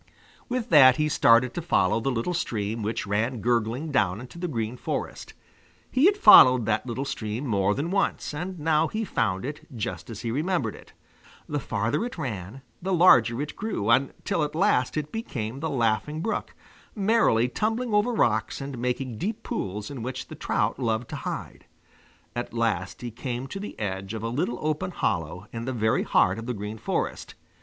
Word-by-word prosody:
With 245 -1 -2
that 130 -6 +8
he 150 - +2
started 120 -3 +4
to 175 - -3
follow 115 - +2
the 135 - -1
little 125 +8 -1
stream 110 -8 -2
which 110 +2 -2
ran 110 +5 -1
gurgling 120 +6 0
down 105 -7 +1
into 125 +7 -10
the 180 - -2
Green 115 -5 -3
Forest. - - -5 0.6
He 265 +7 +5
had 405 +1 +3
followed 125 - +8
that 110 +3 0
little 125 +3 -3
stream 110 0 -4
more 100 -4 +1
than 155 +6 -2
once, 195 -5 0
and 180 +5 -5
now 155 0 +2
he 220 +6 -3
found 105 - -1
it 145 +2 -7
just 120 +3 -4
as 115 - -7
he 115 - -3
remembered 155 - 0
it. - - -15 0.5
The 150 - -2
farther 115 - -1
it 245 - -5
ran, 110 +1 -5 0.2
the 190 +2 -1
larger 120 -9 +5
it 150 - -7
grew, 195 - -1
until 135 +5 +1
at 150 - -3
last 130 -4 +2
it 150 0 -3
became 130 - -4
the 160 +2 -2
Laughing 130 +4 0
Brook, 225 - -3 0.4
merrily 200 - +3
tumbling 225 - -1
over 210 +4 +3
rocks 110 - +1
and 135 -3 -6
making 125 -1 -2
deep 210 - -3
pools 105 +4 -4
in 135 -4 -6
which 130 +2 -5
the - - -8
trout - - -1
loved 115 -1 -1
to - - -5
hide. - - -6 0.7
At 120 -1 -4
last 110 -6 -1
he 120 - -4
came 125 +2 -4
to 165 +9 -6
the 205 - -7
edge 95 0 -3
of 110 - -5
a 115 - -1
little 120 -1 -1
open 155 +4 -1
hollow 90 - -2
in 115 0 -4
the 130 - -2
very 110 -2 +1
heart 95 +4 +2
of 115 - -7
the 125 - -2
Green 105 +2 -6
Forest. - - -3
125 Hz, 190 wpm, -26 LUFS, 110-155 Hz, 0.7 s, that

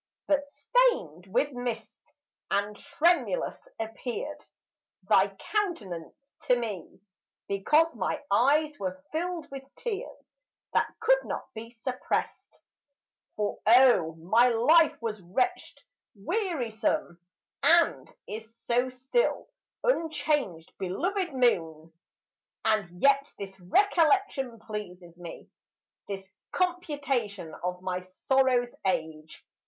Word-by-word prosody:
But 285 -1 +1
stained 285 - +1
with 255 +9 +1
mist, 245 -3 -5 0.5
and 205 +1 0
tremulous, 350 - 0
appeared 240 +6 -5 0.6
Thy - - +5
countenance 280 - -4
to 250 -4 +4
me, 215 -7 -5 0.5
because 300 +12 +3
my 190 -5 -2
eyes 295 +4 +3
Were 280 0 -3
filled 335 0 -3
with 275 -1 -6
tears, 470 0 -6 0.4
that - - +2
could - - +4
not - - -5
be 230 +1 -8
suppressed; 245 +2 -3 0.8
For, 210 -1 -2
oh, 230 -9 +6
my 220 +10 +4
life 295 +8 +4
was 215 -3 -3
wretched, 360 - -2 0.3
wearisome, 235 - -1 0.4
And 335 0 +4 0.2
is 220 +1 -7
so 245 +2 +2
still, 260 - 0 0.3
unchanged, 305 - 0
belovèd 350 - -1
moon! 165 - +1 0.7
And 200 -5 0
yet 280 0 +4
this 195 -1 -8
recollection 310 - +2
pleases 180 -6 -7
me, 175 -1 -10 0.6
This 195 -1 -7 0.2
computation 280 - -1
of 180 0 -3
my 185 -1 -1
sorrow's 245 +6 +1
age. 160 -3 -3
245 Hz, 100 wpm, -28 LUFS, 195-310 Hz, 0.8 s, oh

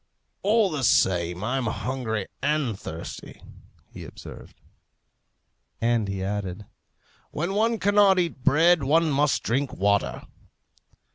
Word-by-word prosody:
"All 210 -1 +2
the 145 -4 -3
same, 90 -4 +2
I'm 125 +2 -1
hungry 110 -3 -3 0.2
and 150 -7 0
thirsty," 80 -3 -8 0.5
he - - -10
observed. - - -12 1.2
And 115 -2 +1
he 95 -1 -4
added, 100 0 -4 0.6
"When 170 +6 -3
one 225 +3 +1
cannot 205 -1 +4
eat 170 -7 -2
bread, 160 +4 +4
one 155 +4 +2
must 145 +1 +1
drink 135 +3 -1
water." 100 +1 0
135 Hz, 115 wpm, -25 LUFS, 105-170 Hz, 1.2 s, cannot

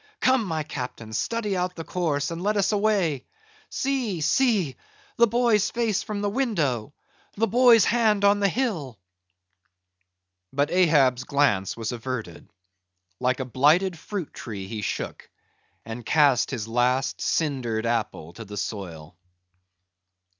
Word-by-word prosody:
Come, 260 -3 +3
my 160 -4 -2
Captain, 125 -6 -7
study 210 - -1
out 180 0 -2
the 165 - -6
course, 155 -5 -1
and 165 +1 -5
let 210 +2 0
us 200 +1 +2
away! 200 - +1 0.4
See, 255 -9 -1
see! 200 - +2 0.4
the 235 -1 +5
boy's 230 -3 +2
face 230 -4 0
from 210 -1 -4
the 205 - 0
window! 160 - -1 0.5
the 225 - +3
boy's 235 -1 +5
hand 215 -4 +2
on 200 0 +4
the 200 -1 +3
hill!" 175 - -2 1.5
But 145 +2 0
Ahab's 145 -8 +3
glance 115 -11 +1
was 115 0 -3
averted; 120 -3 -6 0.7
like 130 +1 0
a 130 - -2
blighted 155 +9 +3
fruit 180 +1 -6
tree 110 -5 -7
he 105 +2 -5
shook, - - -5 0.6
and 115 +2 -7
cast 140 +1 +3
his 115 -5 -4
last, 125 +3 0
cindered 125 -8 -1
apple 105 -8 -2
to 115 - -9
the 105 -1 -9
soil. 85 -7 -6
155 Hz, 135 wpm, -25 LUFS, -, 1.5 s, the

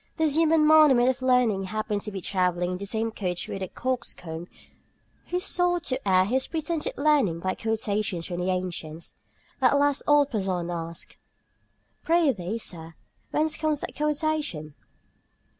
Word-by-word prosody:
This 315 -3 +1
human 320 -1 +4
monument 300 -5 +6
of 260 0 -1
learning 250 -6 +2
happened 215 +1 -2
to 210 - -6
be 195 -2 -5
travelling 180 -1 0
in 180 - -3
the 200 - -5
same 225 +2 -1
coach 180 -5 -3
with 195 - -5
a 190 - -2
coxcomb 180 -11 -4 0.8
who 360 - -1
sought 355 -1 +1
to 255 -9 -3
air 185 -1 +4
his 260 +6 0
pretended 325 0 -3
learning 280 - +2
by 185 +2 -1
quotations 210 -5 -1
from 175 -1 -4
the 180 +1 -1
ancients. 170 -3 -4 0.4
At 265 +2 +4
last 285 -1 +2
old 290 -1 +4
Porson 185 -5 -1
asked: 165 -1 -6 0.9
"Pri'thee, 265 - +1
sir, 165 -5 -5 0.3
whence 310 0 +1
comes 310 -2 0
that - - -6
quotation?" 300 - -1
220 Hz, 150 wpm, -26 LUFS, 180-295 Hz, 0.9 s, monument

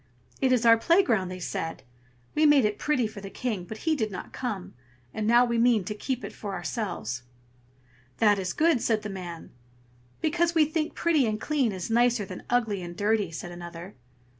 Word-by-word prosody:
"It 260 -1 +3
is 245 -2 +3
our 230 0 +8
playground!" 230 - +3
they 185 - -6
said. 165 -2 -4 0.5
"We 305 0 +4
made 285 -5 +6
it 210 -1 -1
pretty 295 -6 +1
for 210 -2 -6
the 195 - -7
King, 210 -3 -3
but 220 - -9
he 320 -1 +3
did 220 -7 -1
not 185 -3 -8
come, 215 -8 -4 0.4
and 215 -1 -2
now 240 +2 +6
we 235 -1 0
mean 235 -3 +4
to 200 - -4
keep 255 +4 -3
it - - -7
so - - -18
for 205 -2 -4
ourselves." 165 - -3 1.0
"That 210 -3 +4
is 185 -2 -2
good!" 315 - +2
said 220 -2 +1
the 210 - -4
man. 175 -4 -7 0.7
"Because 335 +2 +1
we 315 -2 +6
think 310 0 -2
pretty 315 -7 +2
and 215 0 -1
clean 275 -4 +1
is 190 +2 -5
nicer 240 -2 +3
than - - -8
ugly 225 -5 +1
and 175 -1 -8
dirty!" 205 -2 +1
said 170 +2 -7
another. 175 +1 -9
220 Hz, 200 wpm, -27 LUFS, 190-255 Hz, 1.0 s, our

